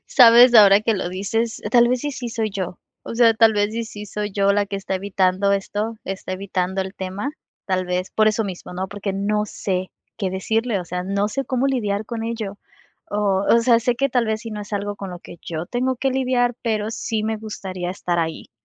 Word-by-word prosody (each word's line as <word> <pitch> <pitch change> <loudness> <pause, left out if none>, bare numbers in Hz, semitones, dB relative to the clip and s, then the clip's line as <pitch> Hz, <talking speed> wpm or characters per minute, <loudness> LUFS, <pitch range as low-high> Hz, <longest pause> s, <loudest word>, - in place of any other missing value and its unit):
¿Sabes? 240 0 +7
Ahora 200 -2 +8
que 220 0 +1
lo 185 -3 -2
dices, 225 +5 -2
tal 240 0 +5
vez 250 +3 0
y 290 - 0
sí 255 -3 -5
soy 225 -2 -2
yo. 185 -3 -4 0.3
O - - -6
sea, 230 -1 +5
tal 225 0 +5
vez 205 +1 0
y 230 0 -2
sí 210 -1 -8
soy 210 +1 -4
yo 200 0 +3
la 205 0 +1
que 200 0 -4
está 195 0 -4
evitando 190 0 +1
esto, 210 +3 -2
está 190 -1 -5
evitando 190 0 -2
el 190 0 -4
tema. 190 +9 -4 0.4
Tal 185 -1 0
vez 180 +1 -2
por 215 0 +3
eso 215 +1 0
mismo, 185 -2 -7
¿no? 190 +1 -3
Porque 200 0 -4
no 210 +2 0
sé 185 -2 -3 0.3
qué 195 -4 -2
decirle, 220 +2 0
o - - -7
sea, 180 +1 -4
no 200 +2 0
sé 275 +5 -3
cómo 260 0 0
lidiar 215 -6 -1
con 230 0 -5
ello, 220 -3 -4 0.5
o 200 -2 +1
o 230 - +6
sea, 235 -1 +4
sé 240 +1 +1
que 275 +1 +1
tal 245 -4 +1
vez 220 0 -1
si 230 - -7
no 210 -1 -5
es 205 - -10
algo 205 0 -2
con 195 -2 -6
lo 175 - -7
que - - -11
yo 165 0 -5
tengo 255 +3 -1
que 270 +2 0
lidiar, 250 -2 +1
pero 220 -2 -1
sí 220 -1 -2
me 220 0 -1
gustaría 190 -4 -5
estar 175 -2 -2
ahí, 160 -1 -3
210 Hz, 230 wpm, -22 LUFS, 190-230 Hz, 0.5 s, Ahora